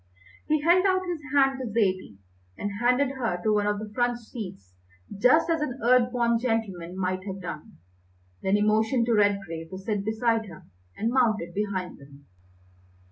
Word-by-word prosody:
He 310 -1 +2
held 345 +4 +4
out 375 0 +1
his 345 -3 -3
hand 270 -2 +3
to 255 - -4
Zaidie, 190 - 0 0.4
and 205 - -3
handed 250 +3 +3
her 225 -9 -1
to 215 - +2
one 205 0 +1
of 210 0 0
the 210 0 -7
front 240 +1 +1
seats 195 - -9 0.4
just 250 +12 +4
as 330 -2 0
an 270 -3 -3
Earth 250 0 +4
born 235 -2 +1
gentleman 200 -7 -2
might 185 0 -2
have 195 0 -5
done. 160 -5 -8 0.6
Then 190 +1 +2
he 205 - +2
motioned 220 +3 +2
to 235 - +1
Redgrave 195 -6 0
to 190 - -7
sit 200 +1 -2
beside 220 +1 0
her, 170 -5 -12 0.3
and 225 +2 0
mounted 220 -9 +1
behind 195 -3 -3
them. 140 0 -16
220 Hz, 175 wpm, -26 LUFS, 190-250 Hz, 0.6 s, held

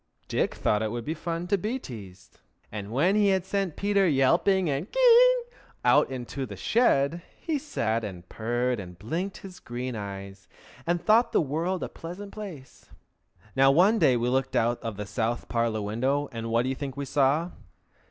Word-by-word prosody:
Dick - - 0
thought 105 - +1
it 110 - -1
would 120 +1 -5
be 155 - -1
fun 170 +1 -4
to 195 +2 +1
be 220 +7 -2
teased, 100 - -11 0.3
and 105 -1 -6
when 165 - +2
he 210 -1 +4
had 190 -2 +2
sent 195 -4 -1
Peter 200 -1 +2
yelping 170 +6 +3
and 145 +6 -2
ki - - -2
yi - - +8
ing 485 -1 -3 0.3
out - - +5
into 130 +1 -5
the - - -8
shed, 170 - +2 0.2
he 315 -4 -2
sat 115 - -1
and 90 -4 -7
purred 120 +3 -1
and 90 -2 -9
blinked 165 - -3
his 185 -2 -10
green 125 +1 -5
eyes, 100 -1 -7 0.4
and 175 0 +2
thought 230 +2 +4
the - - +4
world 165 +5 -1
a - - -2
pleasant 185 +5 -8
place. 170 - -10 0.7
Now 135 0 +5
one 190 +10 +5
day 125 -9 +4
we 120 +1 0
looked 130 +1 0
out 120 +1 +1
of 115 -3 -5
the 105 - -4
south 115 +3 -2
parlor 115 -3 0
window, 130 +7 0
and 115 -1 -5
what 115 +1 +2
do 130 - -1
you 135 - -1
think 135 0 -6
we 140 - -3
saw? 145 +6 +2
135 Hz, 190 wpm, -27 LUFS, 115-190 Hz, 0.7 s, yi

